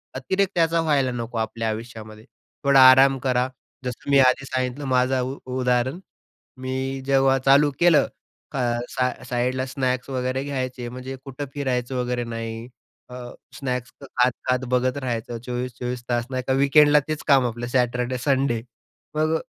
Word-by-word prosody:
अतिरेक 190 Hz, +9 st, 0 dB
त्याचा 165 Hz, -1 st, +2 dB
व्हायला 145 Hz, -5 st, +1 dB
नको. 120 Hz, -1 st, -5 dB
आपल्या 110 Hz, 0 st, -2 dB
आयुष्यामध्ये 110 Hz, -1 st, -7 dB, 0.4 s
थोडा 140 Hz, -1 st, +5 dB
आराम 135 Hz, +1 st, +6 dB
करा. 125 Hz, -1 st, +1 dB, 0.4 s
जसं 125 Hz, +3 st, -6 dB
मी 140 Hz, -1 st, +5 dB
आधी 130 Hz, +1 st, +4 dB
सांगितलं 130 Hz, +1 st, -3 dB
माझं 130 Hz, 0 st, +2 dB
उ 130 Hz, +2 st, -4 dB, 0.2 s
उदाहरण. 125 Hz, +5 st, +1 dB, 0.6 s
मी 130 Hz, +1 st, -3 dB
जेव्हा 135 Hz, -1 st, +3 dB
चालू 140 Hz, +3 st, +4 dB
केलं 170 Hz, -3 st, +5 dB, 0.8 s
सा 125 Hz, -1 st, 0 dB, 0.2 s
साईडला 125 Hz, +1 st, -1 dB
स्नॅक्स 130 Hz, -1 st, -2 dB
वगैरे 130 Hz, 0 st, -1 dB
घ्यायचे, 130 Hz, -3 st, -4 dB
म्हणजे 130 Hz, +2 st, -7 dB
कुठं 135 Hz, +1 st, -6 dB
फिरायचं 130 Hz, -3 st, -2 dB
वगैरे 125 Hz, -1 st, -1 dB
नाही. 115 Hz, 0 st, -5 dB, 0.4 s
अ, 125 Hz, -, -11 dB, 0.4 s
स्नॅक्स 125 Hz, -3 st, -3 dB
खात-खात 130 Hz, -1 st, 0 dB
बघत 125 Hz, +1 st, +1 dB
राहायचं. 120 Hz, -3 st, -3 dB
24-24 125 Hz, 0 st, -4 dB
तास 120 Hz, 0 st, 0 dB
नाही 130 Hz, -1 st, -2 dB
का 130 Hz, -, +1 dB
वीकेंडला 145 Hz, +2 st, +5 dB
तेच 155 Hz, -1 st, -3 dB
काम 135 Hz, -3 st, +5 dB
आपलं 120 Hz, 0 st, -4 dB
सॅटरडे-संडे. 125 Hz, 0 st, 0 dB, 0.5 s
मग 155 Hz, +1 st, +1 dB
130 Hz, 140 wpm, -23 LUFS, 125-135 Hz, 0.8 s, आराम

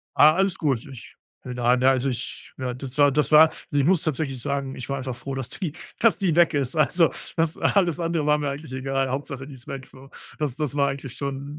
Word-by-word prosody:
Ah, 155 Hz, +1 st, +7 dB
alles 195 Hz, -1 st, +1 dB
gut, 135 Hz, -7 st, 0 dB
ich 115 Hz, -4 st, -12 dB, 0.3 s
na 125 Hz, 0 st, +1 dB
na, 130 Hz, +1 st, +4 dB
also, 135 Hz, +1 st, +1 dB
ich 120 Hz, -2 st, -6 dB
ja, 125 Hz, -1 st, -3 dB
das 130 Hz, +2 st, -8 dB
war 145 Hz, -1 st, +6 dB
das 150 Hz, +2 st, +1 dB
war 155 Hz, +1 st, +8 dB, 0.2 s
also, 145 Hz, -, +2 dB
ich 140 Hz, -, +2 dB
muss 180 Hz, -2 st, +4 dB
tatsächlich 135 Hz, -4 st, -2 dB
sagen, 140 Hz, 0 st, -3 dB
ich 130 Hz, -, -8 dB
war 140 Hz, -, -1 dB
einfach 130 Hz, -1 st, -4 dB
froh, 135 Hz, +3 st, -6 dB
dass 130 Hz, -3 st, -3 dB
die 170 Hz, -6 st, -4 dB, 0.3 s
dass 230 Hz, -1 st, +4 dB
die 180 Hz, -5 st, +1 dB
weg 175 Hz, 0 st, +4 dB
ist. 140 Hz, -1 st, -1 dB
Also, 160 Hz, +2 st, +3 dB, 0.3 s
das 165 Hz, -1 st, +1 dB
alles 175 Hz, -4 st, +2 dB
andere 165 Hz, -2 st, -1 dB
war 150 Hz, 0 st, +4 dB
mir 145 Hz, -1 st, -2 dB
eigentlich 140 Hz, -1 st, -7 dB
egal, 135 Hz, 0 st, -1 dB
Hauptsache, 135 Hz, 0 st, -4 dB
die 145 Hz, -, -10 dB
ist 125 Hz, -2 st, -12 dB
weg, 135 Hz, -2 st, -6 dB
so. 135 Hz, +1 st, -15 dB, 0.3 s
Das 145 Hz, -5 st, -2 dB
das 150 Hz, -2 st, -2 dB
war 140 Hz, -1 st, +2 dB
eigentlich 135 Hz, -2 st, -6 dB
schon 140 Hz, +1 st, -5 dB
140 Hz, 240 wpm, -24 LUFS, 130-155 Hz, 0.3 s, war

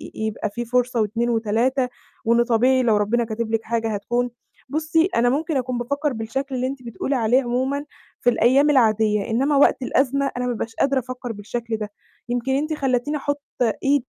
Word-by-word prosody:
يبقى 220 Hz, -1 st, -2 dB
في 240 Hz, +3 st, -5 dB
فرصة 245 Hz, -1 st, +1 dB
و2 230 Hz, +3 st, 0 dB
و3 235 Hz, +4 st, +1 dB, 0.4 s
وإنه 235 Hz, +1 st, +4 dB
طبيعي 250 Hz, +2 st, +3 dB
لو 220 Hz, -3 st, +3 dB
ربنا 225 Hz, +3 st, +1 dB
كاتب 225 Hz, 0 st, -3 dB
لِك 225 Hz, 0 st, 0 dB
حاجة 225 Hz, -1 st, -1 dB
هتكون. 240 Hz, +4 st, -1 dB, 0.4 s
بُصّي، 315 Hz, +3 st, +2 dB
أنا 240 Hz, +1 st, +3 dB
ممكن 300 Hz, +2 st, 0 dB
أكون 255 Hz, -1 st, -2 dB
بافكّر 280 Hz, +4 st, -1 dB
بالشكل 265 Hz, +5 st, -3 dB
اللي 255 Hz, +1 st, 0 dB
أنتِ 265 Hz, -1 st, -6 dB
بتقولي 240 Hz, +4 st, -3 dB
عليه 245 Hz, +2 st, +3 dB
عمومًا 260 Hz, +4 st, -1 dB, 0.4 s
في 245 Hz, -, +4 dB
الأيام 260 Hz, +5 st, +4 dB
العادية 215 Hz, -6 st, +3 dB
إنّما 270 Hz, +6 st, +1 dB
وقت 275 Hz, -, +4 dB
الأزمة 275 Hz, +2 st, +1 dB
أنا 250 Hz, -, -1 dB
ما 250 Hz, -, 0 dB
بابقاش 230 Hz, 0 st, -4 dB
قادرة 275 Hz, -1 st, +2 dB
أفكّر 250 Hz, -1 st, -6 dB
بالشكل 225 Hz, +2 st, -4 dB
ده، 210 Hz, -1 st, -5 dB, 0.4 s
يمكن 245 Hz, +2 st, -1 dB
أنتِ 300 Hz, +4 st, 0 dB
خلّيتيني 275 Hz, 0 st, 0 dB
أحُط 285 Hz, 0 st, -2 dB, 0.4 s
إيدي 275 Hz, -2 st, +2 dB
245 Hz, 180 wpm, -22 LUFS, 225-270 Hz, 0.4 s, وإنه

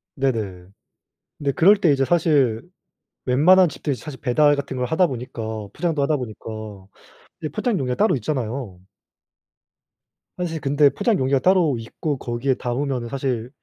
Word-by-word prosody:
네네. 110 Hz, -10 st, -2 dB, 0.7 s
근데 140 Hz, -1 st, -1 dB
그럴 195 Hz, +9 st, +5 dB
때 175 Hz, -7 st, +3 dB
이제 135 Hz, -1 st, +2 dB
사실 145 Hz, -9 st, +2 dB, 0.6 s
웬만한 170 Hz, +8 st, +5 dB
집들이 145 Hz, -1 st, -3 dB
사실 140 Hz, +1 st, -9 dB
배달 145 Hz, +3 st, +3 dB
같은 140 Hz, -2 st, -5 dB
걸 125 Hz, -, -1 dB
하다 175 Hz, +3 st, +3 dB
보니까 125 Hz, -4 st, -6 dB, 0.3 s
포장도 165 Hz, -4 st, -1 dB
하다 145 Hz, +2 st, +1 dB
보니까 120 Hz, -5 st, -8 dB, 1.0 s
이제 155 Hz, -, -3 dB
포장 210 Hz, -, -1 dB
용기가 125 Hz, -2 st, -1 dB
따로 215 Hz, -, +3 dB
있잖아요. 120 Hz, -6 st, -4 dB, 1.6 s
사실 165 Hz, -3 st, -3 dB
근데 145 Hz, +1 st, +4 dB
포장 225 Hz, -, 0 dB
용기가 135 Hz, +1 st, +1 dB
따로 175 Hz, -4 st, +3 dB
있고 140 Hz, +5 st, -4 dB
거기에 120 Hz, +3 st, -1 dB
담으면은 125 Hz, -1 st, -3 dB
사실 125 Hz, -3 st, -2 dB
140 Hz, 315 characters per minute, -22 LUFS, 125-155 Hz, 1.6 s, 그럴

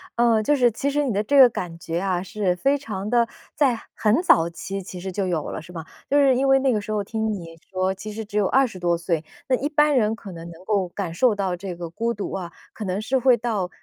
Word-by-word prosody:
呃， 235 Hz, -2 st, +3 dB
就 295 Hz, +7 st, +2 dB
是 245 Hz, -3 st, +4 dB
其 275 Hz, +6 st, -2 dB
实 295 Hz, +1 st, +1 dB
你 250 Hz, -6 st, -1 dB
的 205 Hz, -, +1 dB
这 280 Hz, +6 st, +2 dB
个 260 Hz, -2 st, +10 dB
感 175 Hz, -7 st, -5 dB
觉 170 Hz, 0 st, -3 dB
啊， 185 Hz, -2 st, -1 dB
是 190 Hz, -2 st, -1 dB
非 275 Hz, +10 st, +2 dB
常 210 Hz, -8 st, -5 dB
地 235 Hz, 0 st, +3 dB, 0.3 s
在 255 Hz, -6 st, +2 dB
很 225 Hz, -, +2 dB
早 170 Hz, -, +5 dB
期 195 Hz, +3 st, -6 dB
其 180 Hz, 0 st, -8 dB
实 190 Hz, +1 st, -5 dB
就 190 Hz, 0 st, -2 dB
有 165 Hz, -4 st, -1 dB
了 -, -, -5 dB
是 175 Hz, +2 st, -13 dB
吗？ 165 Hz, -2 st, -7 dB, 0.2 s
就 285 Hz, -, +3 dB
是 270 Hz, -2 st, +5 dB
因 270 Hz, +2 st, +1 dB
为 270 Hz, 0 st, +6 dB
那 265 Hz, -2 st, +2 dB
个 210 Hz, -, 0 dB
时 215 Hz, -, -6 dB
候 210 Hz, -1 st, 0 dB
听 220 Hz, +1 st, -2 dB
你 165 Hz, -5 st, -6 dB, 0.2 s
说， 185 Hz, 0 st, 0 dB
其 210 Hz, +3 st, -8 dB
实 220 Hz, 0 st, -6 dB
只 205 Hz, -, -11 dB
有 195 Hz, -, +2 dB
20 255 Hz, -8 st, +2 dB
多 175 Hz, -1 st, +1 dB
岁。 170 Hz, -2 st, -1 dB, 0.2 s
那 260 Hz, -, +3 dB
一 285 Hz, +4 st, -2 dB
般 295 Hz, -1 st, +3 dB
人 220 Hz, -2 st, +2 dB
可 200 Hz, -4 st, -10 dB
能 170 Hz, 0 st, -9 dB
能 170 Hz, +2 st, -13 dB
够 195 Hz, -4 st, 0 dB
感 175 Hz, -3 st, -4 dB
受 235 Hz, +3 st, +3 dB
到 190 Hz, -3 st, -1 dB
这 180 Hz, 0 st, -6 dB
个 170 Hz, -1 st, -6 dB
孤 230 Hz, +6 st, -1 dB
独 205 Hz, -, -5 dB
啊， 175 Hz, -3 st, -5 dB, 0.2 s
可 215 Hz, -, -7 dB
能 190 Hz, +1 st, -2 dB
是 265 Hz, +5 st, 0 dB
会 250 Hz, -1 st, +4 dB
到 210 Hz, -6 st, -2 dB
205 Hz, 280 characters per minute, -23 LUFS, 180-245 Hz, 0.3 s, 个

